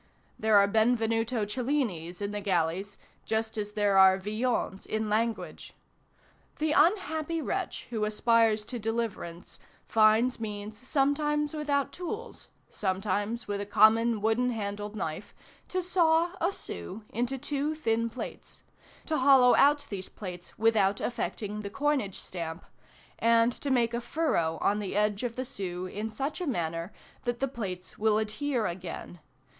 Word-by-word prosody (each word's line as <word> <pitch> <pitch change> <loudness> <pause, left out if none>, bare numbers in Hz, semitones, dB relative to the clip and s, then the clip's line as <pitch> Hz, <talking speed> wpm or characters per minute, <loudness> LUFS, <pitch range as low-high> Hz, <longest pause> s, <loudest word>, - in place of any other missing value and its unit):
There 215 -1 +4
are 200 - +7
Benvenuto 225 +1 +1
Cellinis 210 - -2
in 200 - -2
the 210 0 -4
galleys, 190 +1 -1 0.3
just 220 0 -1
as 210 -1 -3
there 205 -2 +3
are 190 0 +7
Villons 210 0 -2
in 220 -1 -2
language. 225 +1 -2 0.8
The 310 0 0
unhappy 320 0 +2
wretch - - -3
who 220 -3 -1
aspires 220 0 +3
to 245 +1 -5
deliverance 220 -6 -4 0.3
finds 225 +3 +4
means 210 -1 -5
sometimes 290 +4 0
without 290 -2 0
tools, 435 +7 -6 0.2
sometimes 205 +4 -1
with 200 -1 -2
a - - -3
common 220 +1 +4
wooden 230 +3 +2
handled 205 -2 -4
knife, 160 -1 -5 0.3
to 370 0 -2
saw 340 -1 +3
a 355 - +3
sou 215 - -7
into 245 +4 -1
two 290 +3 -2
thin 230 -6 0
plates, 245 - -8 0.4
to 315 - 0
hollow 260 -2 +6
out 290 +1 +4
these 190 -2 -5
plates 180 -4 -8
without 210 -3 +3
affecting 210 -3 -3
the 200 - -5
coinage 275 -5 0
stamp, 165 -1 -6 0.5
and 230 +1 +4
to 280 - -4
make 240 -3 +2
a 235 - -1
furrow 240 - 0
on 205 +1 +2
the 200 -2 -4
edge 210 -1 +1
of 240 -2 -3
the 255 - -3
sou 185 -8 -4
in 210 +4 -4
such 270 - -4
a 355 - -2
manner 170 - -2 0.3
that 240 -1 -2
the 270 - +1
plates 190 -8 -6
will 215 0 +3
adhere 225 +3 -1
again. 175 -1 -6
225 Hz, 145 wpm, -29 LUFS, 205-260 Hz, 0.8 s, are